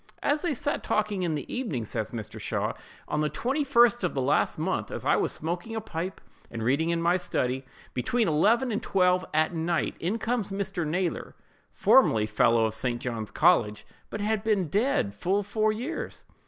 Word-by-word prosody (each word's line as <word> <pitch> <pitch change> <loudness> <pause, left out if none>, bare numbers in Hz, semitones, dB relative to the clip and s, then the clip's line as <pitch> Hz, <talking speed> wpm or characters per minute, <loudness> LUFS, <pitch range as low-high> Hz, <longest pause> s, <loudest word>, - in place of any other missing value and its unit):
As 295 +1 +1
they 335 -5 -1
sat 290 +2 -2
talking 210 -2 0
in 170 -3 0
the 145 - -4
evening, 160 - -2
says 110 0 -3
Mr. 110 -3 -7
Shaw: - - -2 0.3
'On 150 - -1
the 150 - +1
21st 240 - +2
of 180 - -1
the 135 - 0
last 135 - +1
month, - - -2
as - - -6
I - - +4
was - - +1
smoking 175 +7 -4
a - - -1
pipe, 180 -2 -5 0.3
and 115 -1 -5
reading 140 +8 +1
in 170 0 +1
my 175 +2 +3
study, 130 -7 -1 0.3
between 225 - 0
eleven 220 - +3
and 215 +2 -1
twelve 180 -2 +2
at 155 +2 +2
night, 165 +1 0
in 185 +7 -1
comes 225 -3 -2
Mr. 195 -4 -2
Naylor 175 +3 -2 0.4
(formerly 110 - +4
fellow 110 +1 +3
of 110 - -1
St. 120 +1 -2
John's 115 -4 -4
college, 105 -12 +2 0.2
but 210 - -5
had 215 0 0
been 205 -7 +1
dead 205 - +1
full 190 - 0
four 215 +2 +1
years). 250 +10 -5
180 Hz, 185 wpm, -27 LUFS, 140-220 Hz, 0.4 s, I